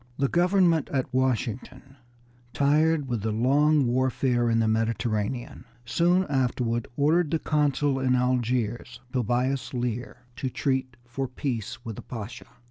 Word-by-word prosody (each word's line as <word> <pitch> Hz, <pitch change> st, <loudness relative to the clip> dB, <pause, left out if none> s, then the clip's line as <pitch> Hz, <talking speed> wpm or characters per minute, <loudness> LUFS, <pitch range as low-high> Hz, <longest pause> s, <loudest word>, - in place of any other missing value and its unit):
The 140 Hz, -, +2 dB
government 175 Hz, -2 st, +3 dB
at 130 Hz, -1 st, -2 dB
Washington, 130 Hz, +1 st, -2 dB, 0.6 s
tired 150 Hz, +1 st, +2 dB
with 120 Hz, -4 st, -2 dB
the 110 Hz, +1 st, -1 dB
long 140 Hz, +6 st, +3 dB
warfare 125 Hz, -1 st, +1 dB
in 115 Hz, -, +2 dB
the 115 Hz, -1 st, +2 dB
Mediterranean, 115 Hz, +1 st, -1 dB, 0.2 s
soon 175 Hz, +8 st, +2 dB
afterward 125 Hz, -5 st, -1 dB
ordered 155 Hz, +3 st, +3 dB
the 165 Hz, -, +1 dB
consul 145 Hz, -3 st, +1 dB
at 130 Hz, -1 st, +1 dB
Algiers, 125 Hz, -2 st, 0 dB
Tobias 130 Hz, +3 st, -1 dB
Lear, 120 Hz, 0 st, -4 dB
to 130 Hz, -, -2 dB
treat 130 Hz, -1 st, -1 dB
for 130 Hz, +3 st, -4 dB
peace 120 Hz, -3 st, -4 dB
with 110 Hz, -3 st, -6 dB
the -, -, -6 dB
Pasha. 115 Hz, -2 st, -8 dB
130 Hz, 130 wpm, -26 LUFS, 120-140 Hz, 0.6 s, government